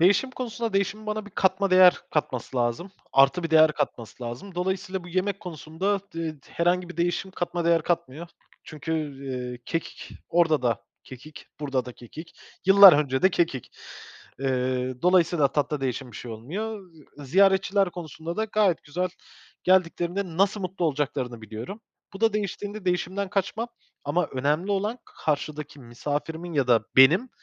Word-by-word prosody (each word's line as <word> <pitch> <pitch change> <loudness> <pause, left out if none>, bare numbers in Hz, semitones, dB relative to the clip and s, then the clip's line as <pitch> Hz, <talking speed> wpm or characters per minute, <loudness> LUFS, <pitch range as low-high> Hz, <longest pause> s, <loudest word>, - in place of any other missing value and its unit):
Değişim 200 +9 +4
konusunda 235 -3 -4
değişimin 200 +2 -1
bana 215 0 -3
bir - - -11
katma 190 +1 +1
değer 185 -1 +8 0.2
katması 130 -4 -2
lazım. 120 +10 -1 0.2
Artı 135 +6 +5
bir 165 - -3
değer 155 -1 +6
katması 115 -2 -4
lazım. 125 +12 -7
Dolayısıyla 185 0 -2
bu 175 - -10
yemek 190 +2 -1
konusunda 180 +4 -2
d - - -5
ııı, 160 -1 -3
herhangi 175 +1 0
bir 175 - -10
değişim 175 +2 -1
katma 175 -2 -3
değer 170 -1 +3
katmıyor. 170 -1 -2 0.4
Çünkü, 155 +1 -6 0.3
eee, 125 -2 -4
kekik 165 - -5 0.2
orada 165 -4 +3
da 120 -2 0 0.2
kekik, 135 +4 -12
burada 135 -3 -1
da 125 - -8
kekik, 150 +8 -12 0.3
yıllar 195 -1 +10
önce 140 -3 +1
de 190 - +6
kekik. 165 -8 -1 0.7
Eee, 130 -1 -1
dolayısıyla 175 -5 +4
tatta 145 0 0
değişen 130 -1 -3
bir - - -9
şey 120 - -7
olmuyor. 195 - -5 0.4
Iıı, 145 - -9
ziyaretçiler 195 +3 +3
konusunda 170 0 -7
da 220 - +1
gayet 210 -5 +1
güzel 180 +5 -2 0.6
geldiklerinde 180 0 +1
nasıl 200 +2 +2
mutlu 185 -1 -3
olacaklarını 130 -5 -2
biliyorum. 115 - -7 0.3
Bu 195 - -10
da 225 -2 +3
değiştiğinde 205 0 -4
değişimden 185 +2 -1
kaçmam 205 +5 -1 0.4
ama 170 +5 +1
önemli 150 +9 -1
olan 210 +5 -1 0.3
karşıdaki 150 -1 -2
misafirimin 150 +7 -4
ya 140 -5 +1
da 120 -2 +5 0.2
benim 170 - +7
170 Hz, 155 wpm, -26 LUFS, 140-190 Hz, 0.7 s, yıllar